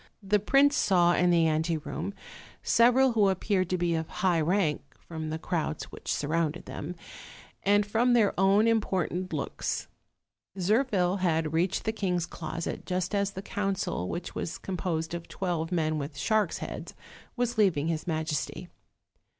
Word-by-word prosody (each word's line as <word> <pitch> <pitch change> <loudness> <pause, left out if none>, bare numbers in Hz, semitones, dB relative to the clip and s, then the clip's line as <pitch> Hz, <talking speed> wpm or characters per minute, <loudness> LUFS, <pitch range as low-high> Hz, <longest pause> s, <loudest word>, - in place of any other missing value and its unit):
The 205 +2 +2
prince 275 +7 +4
saw 175 -8 +4
in 180 0 +3
the 170 -1 +4
anteroom 160 +4 -2 0.5
several 250 +3 +5
who 210 -4 +3
appeared 190 -1 0
to 185 - +1
be 175 -1 0
of 160 -1 -1
high 185 -5 +1
rank, 165 -2 +1 0.2
from 160 -2 -6
the 160 - -2
crowds 160 -2 -3
which - - -6
surrounded 160 +2 -1
them, 170 +5 -6 0.7
and 205 +1 +3
from 230 +4 +2
their 225 -4 +4
own 195 +4 +4
important 185 -5 0
looks. - - -3 0.7
Zirphil 195 -2 +2
had 160 -3 +1
reached 170 +3 +1
the 220 - 0
king's 180 -6 -1
closet, 170 -1 -5
just 185 +1 -1
as 200 -1 +1
the 195 0 -7
council, 195 - -2
which 175 +1 -5
was 165 - -4
composed 170 -3 -3
of 170 -1 -5
twelve 175 -3 -2
men 155 -3 0
with 140 0 -6
sharks' 215 +4 +1
heads, - - -7 0.4
was 245 -2 -1
leaving 165 -8 +3
his 165 0 -2
majesty. 155 -3 -2
180 Hz, 150 wpm, -28 LUFS, 165-205 Hz, 0.7 s, several